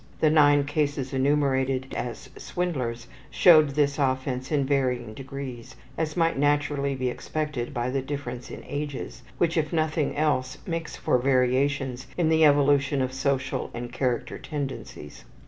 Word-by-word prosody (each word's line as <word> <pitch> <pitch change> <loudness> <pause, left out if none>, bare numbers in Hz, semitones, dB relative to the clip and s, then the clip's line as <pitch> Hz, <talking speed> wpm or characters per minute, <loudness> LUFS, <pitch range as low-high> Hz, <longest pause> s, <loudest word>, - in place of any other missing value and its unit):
The 155 - +4
9 145 -2 +5
cases 145 -2 -1
enumerated 135 -1 +1
as 120 -2 -5
swindlers 125 -10 -3 0.2
showed 155 -4 +6
this 140 0 +1
offense 130 -1 -1
in 145 -3 +2
varying 125 -5 0
degrees, 135 -1 -8 0.2
as 160 0 -2
might 165 -4 +2
naturally 145 -1 +1
be 130 -1 -1
expected 150 -3 -3
by 125 -2 -2
the 135 0 0
differences 130 -3 -6
in - - -11
ages, 145 -3 -5 0.2
which, 170 -1 +1
if 155 -2 0
nothing 155 -3 0
else, 130 -4 0
makes 165 -2 -4
for 125 - +1
variations 130 0 +1
in 170 -3 +2
the 160 0 +4
evolution 145 -1 +4
of 130 0 -1
social 135 0 -1
and 120 0 -6
character 125 -3 -1
tendencies. 135 - -6
140 Hz, 145 wpm, -26 LUFS, 130-150 Hz, 0.2 s, showed